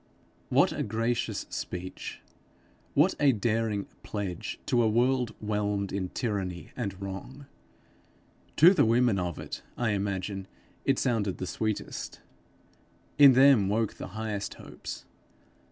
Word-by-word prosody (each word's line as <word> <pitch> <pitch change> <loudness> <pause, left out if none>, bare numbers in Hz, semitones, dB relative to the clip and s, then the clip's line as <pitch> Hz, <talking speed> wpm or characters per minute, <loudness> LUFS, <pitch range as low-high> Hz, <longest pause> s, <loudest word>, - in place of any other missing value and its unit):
What - - +4
a - - -3
gracious 115 +2 -1
speech, 90 +1 -6 0.7
what 155 +7 +5
a 145 -2 +5
daring 110 -2 0 0.2
pledge 100 -5 -4
to 120 - +3
a 115 - +3
world 125 +2 +2
whelmed 105 -2 -1
in 95 -2 -2
tyranny 95 -7 -3
and 100 -6 -4
wrong! 100 +9 -7 1.1
To 175 +5 +8
the 185 - +4
women 115 -2 +3
of 90 -2 -3
it, - - -6 0.2
I 120 -3 +1
imagine, 100 -1 -2 0.4
it 135 - +3
sounded 110 -7 0
the 95 - -4
sweetest, 110 +3 -3 1.0
in 140 -2 +10
them 130 -6 +6
woke 110 +1 +1
the - - -5
highest 105 -2 -3
hopes. - - -8
105 Hz, 125 wpm, -29 LUFS, 100-120 Hz, 1.1 s, in